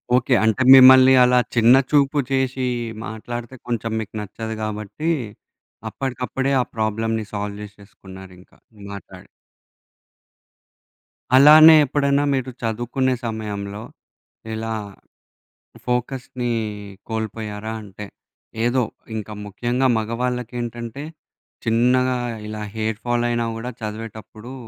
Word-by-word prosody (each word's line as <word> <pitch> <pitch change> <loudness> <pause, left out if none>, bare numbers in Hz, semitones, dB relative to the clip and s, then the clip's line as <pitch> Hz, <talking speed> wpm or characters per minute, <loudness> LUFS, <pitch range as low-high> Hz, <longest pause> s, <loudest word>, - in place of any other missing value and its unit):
Okay. 125 +1 +2
అంటే 110 +3 +1
మిమ్మల్ని 130 0 +8
అలా 125 0 +4 0.2
చిన్న 120 +2 +6 0.2
చూపు 145 0 +3
చేశి 130 -1 0 0.4
మాట్లాడితే 120 +3 -7
కొంచెం 115 -1 -2
మీకు 110 - -7
నచ్చదు 110 +2 -6
గాబట్టి 110 +8 -4 0.8
అప్పడికప్పుడే, 130 +2 -3
ఆ - - 0
ప్రాబ్లమ్‌ని 110 0 -1
సాల్వ్ 100 0 -4
జేశేసుకున్నారింకా 95 -2 -14 0.4
మాట్లాడి. 100 - -11 2.1
అలానే 155 +3 +9
ఎప్పుడైనా 140 +1 +1
మీరు 130 -1 -2
చదువుకునే 120 +3 -1
సమయంలో 105 -2 -5 0.7
ఇలా 110 0 -4 1.1
ఫోకస్‌ని 125 0 -3 0.6
కోల్పోయారా? 110 -1 -5
అంటే 105 0 -10 0.6
ఏదో 125 +1 +2 0.3
ఇంకా 105 0 -6
ముఖ్యంగా 120 +6 -1
మగవాళ్ళకేంటంటే 120 +1 -4 0.6
చిన్నగా 125 +3 +2 0.3
ఇలా 105 0 -6
హెయిర్ 110 0 -2
ఫాల్ 120 0 0
అయినా 120 -1 -1
కూడా 120 +2 -5
చదివేటప్పుడు 110 +2 -8
115 Hz, 90 wpm, -21 LUFS, 110-130 Hz, 2.1 s, అలానే